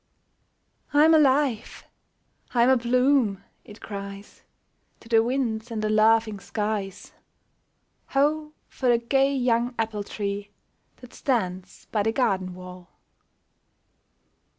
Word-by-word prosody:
" -, -, -37 dB
I'm 310 Hz, +2 st, +6 dB
alive! 275 Hz, -6 st, +2 dB, 0.7 s
I'm 240 Hz, +1 st, +4 dB
abloom! 250 Hz, -4 st, +2 dB
" -, -, -43 dB
it 210 Hz, -, -14 dB
cries 200 Hz, -1 st, -8 dB, 0.6 s
To -, -, -16 dB
the 225 Hz, -1 st, +4 dB
winds 235 Hz, -2 st, -2 dB
and 220 Hz, -2 st, -4 dB
the 215 Hz, -, 0 dB
laughing 215 Hz, -1 st, +3 dB
skies. 205 Hz, -2 st, -4 dB, 1.0 s
Ho! 300 Hz, +2 st, 0 dB
for 255 Hz, -, -2 dB
the 240 Hz, -, +5 dB
gay 270 Hz, +4 st, +1 dB
young 245 Hz, -1 st, 0 dB
apple 220 Hz, -2 st, -2 dB
tree 200 Hz, 0 st, -5 dB, 0.5 s
That 250 Hz, -1 st, -13 dB
stands 185 Hz, -8 st, -3 dB
by 215 Hz, -, +1 dB
the 220 Hz, +2 st, +1 dB
garden 190 Hz, -7 st, -1 dB
wall 180 Hz, -1 st, -11 dB
225 Hz, 115 wpm, -25 LUFS, 205-255 Hz, 1.0 s, I'm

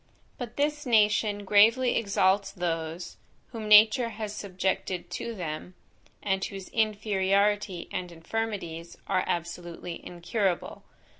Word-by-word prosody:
But 240 Hz, -4 st, -6 dB
this 295 Hz, 0 st, 0 dB
nation 210 Hz, -2 st, +3 dB
gravely 225 Hz, +5 st, +5 dB
exalts 200 Hz, -2 st, +2 dB
those, 165 Hz, -1 st, -4 dB, 0.3 s
whom 225 Hz, -3 st, -6 dB
nature 215 Hz, +3 st, +7 dB
has 215 Hz, -2 st, -5 dB
subjected 190 Hz, -2 st, -3 dB
to 235 Hz, -, -4 dB
them, 175 Hz, 0 st, -6 dB, 0.5 s
and 195 Hz, -1 st, 0 dB
whose 195 Hz, -1 st, -6 dB
inferiority 205 Hz, -3 st, +1 dB
and 180 Hz, -1 st, -4 dB
infirmities 170 Hz, -2 st, -4 dB
are 185 Hz, -, +1 dB
absolutely 170 Hz, 0 st, -4 dB
incurable. 180 Hz, +1 st, -2 dB
200 Hz, 105 wpm, -28 LUFS, 180-215 Hz, 0.5 s, nature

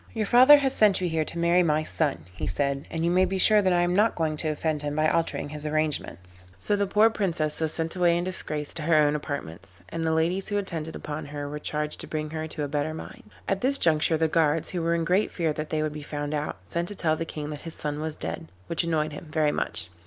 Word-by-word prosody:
'Your 220 Hz, -1 st, 0 dB
father 255 Hz, +7 st, +8 dB
has 270 Hz, -2 st, 0 dB
sent 210 Hz, -3 st, +4 dB
you 180 Hz, -, 0 dB
here 160 Hz, -2 st, 0 dB
to 170 Hz, -, -7 dB
marry 170 Hz, +1 st, +4 dB
my 155 Hz, -2 st, +2 dB
son,' 145 Hz, -, -1 dB
he -, -, -4 dB
said, 140 Hz, 0 st, -1 dB
'and 165 Hz, 0 st, -2 dB
you 170 Hz, -, +2 dB
may 185 Hz, +1 st, +4 dB
be 190 Hz, +1 st, 0 dB
sure 210 Hz, +2 st, +5 dB
that 190 Hz, -2 st, +2 dB
I 175 Hz, -1 st, +3 dB
am 175 Hz, +1 st, +1 dB
not 215 Hz, +3 st, +3 dB
going 160 Hz, -2 st, 0 dB
to 155 Hz, -, -2 dB
offend 155 Hz, 0 st, -1 dB
him 145 Hz, 0 st, -3 dB
by 155 Hz, 0 st, +2 dB
altering 165 Hz, -2 st, -1 dB
his 150 Hz, 0 st, -6 dB
arrangements.' 145 Hz, -, -2 dB
So 150 Hz, -, 0 dB
the 200 Hz, 0 st, 0 dB
poor 215 Hz, +3 st, +4 dB
Princess 165 Hz, -8 st, -1 dB
was 160 Hz, -1 st, +1 dB
sent 165 Hz, +1 st, -2 dB
away 175 Hz, -2 st, +3 dB
in 175 Hz, -, -1 dB
disgrace 155 Hz, -5 st, -4 dB
to -, -, -6 dB
her 160 Hz, +1 st, +2 dB
own 150 Hz, -1 st, +4 dB
apartments, 95 Hz, -, -6 dB
and 165 Hz, 0 st, -4 dB
the 160 Hz, -, +1 dB
ladies 170 Hz, +4 st, +1 dB
who 205 Hz, -, -1 dB
attended 165 Hz, -5 st, -4 dB
upon 150 Hz, 0 st, -6 dB
her 145 Hz, 0 st, -5 dB
were 150 Hz, +1 st, -5 dB
charged 150 Hz, 0 st, -3 dB
to -, -, -6 dB
bring 155 Hz, -1 st, -4 dB
her 160 Hz, 0 st, -4 dB
to 155 Hz, -1 st, -4 dB
a -, -, -1 dB
better 145 Hz, +2 st, -2 dB
mind. 105 Hz, -, -10 dB, 0.2 s
At 195 Hz, -, 0 dB
this 275 Hz, +2 st, +3 dB
juncture 160 Hz, -, +3 dB
the 160 Hz, 0 st, +2 dB
guards, 160 Hz, -1 st, +1 dB
who 180 Hz, -, -2 dB
were 165 Hz, +1 st, +1 dB
in 165 Hz, -1 st, -1 dB
great 185 Hz, +5 st, +2 dB
fear 165 Hz, -3 st, -1 dB
that 155 Hz, +1 st, -5 dB
they 155 Hz, -1 st, 0 dB
would 155 Hz, -1 st, -2 dB
be 150 Hz, -, -7 dB
found 145 Hz, 0 st, -4 dB
out, 150 Hz, -8 st, -3 dB
sent 170 Hz, -, -3 dB
to 205 Hz, -, -6 dB
tell 155 Hz, -4 st, +1 dB
the 165 Hz, -, -3 dB
King 150 Hz, -2 st, -6 dB
that 150 Hz, -, -6 dB
his 165 Hz, -1 st, -8 dB
son 150 Hz, 0 st, -4 dB
was 155 Hz, 0 st, -3 dB
dead, 80 Hz, 0 st, -5 dB, 0.2 s
which 170 Hz, +1 st, -1 dB
annoyed 155 Hz, -2 st, 0 dB
him 150 Hz, -, -9 dB
very 150 Hz, -1 st, +2 dB
much. 85 Hz, -, -2 dB
160 Hz, 265 wpm, -26 LUFS, 150-175 Hz, 0.2 s, father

